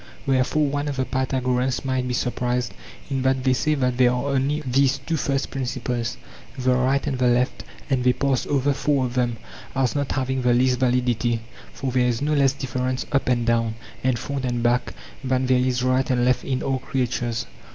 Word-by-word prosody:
Wherefore 135 +3 +2
one 145 +1 -1
of 145 - -2
the 130 -1 0
Pythagoreans 130 0 0
might 130 -1 0
be 125 - -1
surprised 125 0 -1 0.4
in 135 -1 0
that 130 0 +1
they 130 -1 +3
say 155 +4 +1
that 125 -3 0
there 125 -1 +6
are 125 +3 -1
only 140 +3 +1
these 135 +2 +3
two 150 +5 -3
first 135 -2 -1
principles, 125 -3 -3 0.4
the 130 0 +2
right 130 +2 +1
and 135 -4 -2
the 125 - +3
left, 125 +1 +1 0.2
and 130 -3 +1
they 125 - +5
pass 135 -2 0
over 140 0 +2
four 140 -1 +1
of 120 - -4
them 120 -2 0 0.4
as 135 -2 +1
not 140 -1 -1
having 130 -1 -1
the 125 -1 +3
least 125 0 +2
validity; 120 -2 +1 0.3
for 135 -1 -4
there 125 0 +2
is 120 -2 0
no 150 +2 0
less 140 -2 +3
difference 130 -1 -2
up 140 -2 +1
and 120 -2 +1
down, 115 -1 +1 0.3
and 130 -1 +2
front 140 +2 -4
and 120 -2 -1
back 120 +1 +1 0.3
than 130 0 +1
there 130 0 +3
is 125 -1 +1
right 130 +1 +2
and 125 -2 +2
left 125 0 +2
in 130 -2 -2
all 135 -1 0
creatures. 120 -3 -2
130 Hz, 205 wpm, -23 LUFS, 125-135 Hz, 0.4 s, there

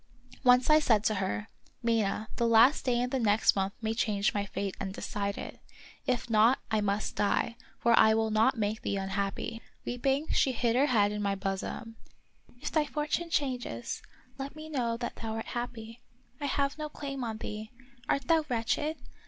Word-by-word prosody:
of - - -32
Peter - - -20
Schlemihl. - - -19
47 - - +5
Once 250 +2 +6
I 305 - +8
said 215 -6 +4
to 215 - +2
her: 195 +2 -2 0.2
" - - -33
Mina, 220 -2 0
the 235 - +2
last 230 +6 +5
day 245 -2 +2
in 250 +1 -1
the 265 - 0
next 215 -2 +4
month 195 0 0
may 220 0 0
change 210 -3 +1
my 205 -1 -1
fate 195 0 -3
and 195 0 -4
decide 200 -1 -3
it; - - -7 0.5
if 245 -1 0
not, 225 +3 +5
I 215 -1 +2
must 205 +1 -1
die, 205 +2 +1 0.2
for 235 -1 +3
I 220 -1 +6
will 220 0 +1
not 225 +4 +3
make 215 0 -1
thee 200 - -1
un 195 0 -3
happy." 200 +3 -3 0.2
Weeping, 270 +5 0
she 265 - +3
hid 235 -1 +1
her 275 +3 +4
head 205 -6 +3
in 210 0 -3
my 200 -1 0
bosom. 195 +4 -4 0.3
" 245 - -28
If - - -2
thy 310 -2 +2
fortune 300 +3 -2
changes, 250 - -2 0.4
let 275 +2 -5
me 310 0 -9
know 240 -6 -1
that 240 0 -5
thou 225 -1 -4
art 225 - -4
happy. 235 -1 -6 0.4
I 285 - -2
have 280 +2 0
no 305 0 -3
claim 275 -3 -5
on 225 -2 -3
thee. 215 0 -6 0.4
Art 275 - +2
thou 325 -1 +4
wretched. 260 +7 0
230 Hz, 210 wpm, -30 LUFS, 210-260 Hz, 0.5 s, I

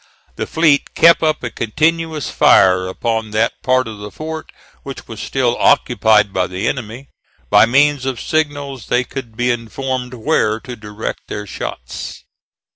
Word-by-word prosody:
The - - -4
fleet 155 -3 +2
kept 170 0 +6
up 155 -3 0
a 120 - -3
continuous 160 +5 -1
fire 90 -1 +4
upon 110 +3 -2
that 115 +1 0
part 130 -1 +2
of 110 -2 -8
the 105 0 -7
fort 160 +5 -7 0.3
which 135 -1 -9
was 110 -2 -8
still 125 -3 0
occupied 110 -6 +3
by 90 -1 0
the 95 +4 -3
enemy. 125 +1 -4 0.4
By - - +6
means 140 +2 +3
of 130 -3 -2
signals 145 -5 -2
they 125 +1 +2
could 120 -3 -8
be 125 0 +2
informed 125 +2 -4
where 110 -4 +1
to 125 -1 -8
direct 105 0 -6
their 105 - -5
shots. - - -7
125 Hz, 155 wpm, -18 LUFS, 110-145 Hz, 0.4 s, kept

